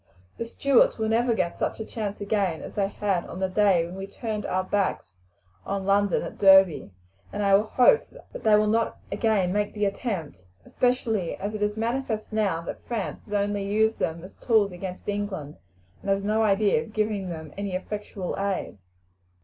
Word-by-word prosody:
The 230 - -3
Stuarts 265 +2 +3
will 220 -1 -1
never 235 +1 +2
get 170 - -1
such - - -1
another 220 - -7
chance 210 -3 -4
again 200 -5 -1
as - - -8
they 200 -1 +1
had 195 -3 -1
on 180 - -7
the 190 - +1
day 185 -3 +3
when 170 - -8
we 195 +1 -6
turned 215 0 -4
our 185 0 0
backs 185 - -2 0.4
on 195 -1 -3
London 200 -1 +2
at - - -8
Derby, 190 -3 +6 0.4
and 205 - -2
I 200 0 +5
hope 250 - +4 0.3
that - - -7
they 215 -1 +6
will 210 0 +4
not 225 +2 +1
again 200 -5 +1
make 205 +1 -1
the 210 0 +1
attempt, 195 - -3 0.2
especially 230 -7 0
as 205 +2 -4
it 215 - -5
is 210 +1 0
manifest 230 -1 -2
now 200 -6 +1
that 165 - -7
France 230 -4 -4
has 210 - -9
only 205 0 0
used 220 +3 +1
them 165 +1 -2
as 185 - -11
tools 215 -5 +2
against 180 +1 -7
England, 200 -8 -3 0.4
and - - -5
has 195 0 +1
no 215 +2 +1
idea 210 +1 +3
of 230 -2 -10
giving 210 -3 -1
them 160 -3 -7
any 200 -2 -3
effectual 200 -1 -4
aid." 195 - -2
205 Hz, 190 wpm, -26 LUFS, 190-220 Hz, 0.4 s, Derby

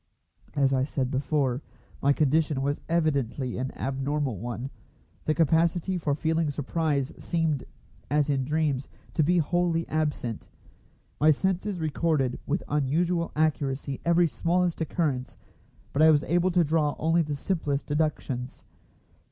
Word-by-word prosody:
As 135 -1 +3
I 130 -1 +2
said 135 -2 -2
before, 135 -1 0 0.4
my 140 - +4
condition 150 -1 +2
was 145 +1 -1
evidently 140 -7 0
an 130 +1 -2
abnormal 135 -3 -2
one. 120 +3 -5 0.5
The 155 - +1
capacity 165 +4 +2
for 145 -3 0
feeling 160 0 0
surprise 145 -1 -1
seemed, 160 -5 -1 0.4
as 145 +1 +2
in 140 -2 +1
dreams, 145 -2 0 0.2
to 160 - +2
be 175 +4 +3
wholly 170 0 +1
absent. 150 -7 -2 0.7
My 155 - +5
senses 190 +5 +1
recorded 155 -4 0
with 160 +6 0
unusual 165 +4 0
accuracy 140 -3 0
every 170 +1 +4
smallest 170 +2 0
occurrence, 145 -5 -1 0.6
but 140 - +1
I 160 - +8
was 150 -2 +4
able 175 +2 +2
to 175 -1 +3
draw 150 -1 +1
only 165 +2 +2
the 150 -2 -2
simplest 145 -3 -1
deductions. 145 -4 -2
150 Hz, 135 wpm, -27 LUFS, 135-165 Hz, 0.7 s, I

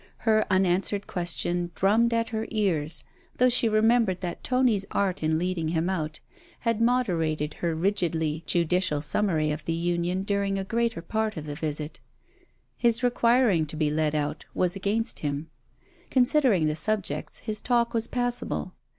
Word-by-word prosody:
Her 215 -1 +3
unanswered 190 +1 +2
question 175 0 -1
drummed 220 +5 +3
at 230 0 0
her 220 0 -3
ears, 170 -8 0 0.3
though 250 0 +5
she 235 -2 +3
remembered 220 -3 +3
that 175 -2 -5
Tony's 250 -6 +2
art 195 -3 0
in 155 0 +1
leading 175 -1 -1
him 165 +3 0
out 155 -4 -3 0.4
had 230 -2 0
moderated 165 - +1
her 170 -2 0
rigidly 165 -4 0
judicial 175 -2 +1
summary 155 -1 +1
of 150 +1 -4
the 165 - -1
union 175 +2 -1
during 200 -1 0
a 195 - -2
greater 230 -3 -1
part 220 +2 -2
of 155 - -5
the 150 - -5
visit. 150 0 -4
But - - -34 0.8
his 235 0 +2
requiring 235 -8 +3
to 150 - -3
be 155 -1 0
led 155 0 0
out, 150 +1 -2
was 180 0 +1
against 205 +4 -1
him. 145 +2 -4 0.6
Considering 250 - +3
the 150 0 0
subjects, 190 -5 -1
his 215 -2 -5
talk 240 -1 +1
was 230 -1 +1
passable. 245 -6 -2
185 Hz, 160 wpm, -26 LUFS, 160-225 Hz, 0.8 s, though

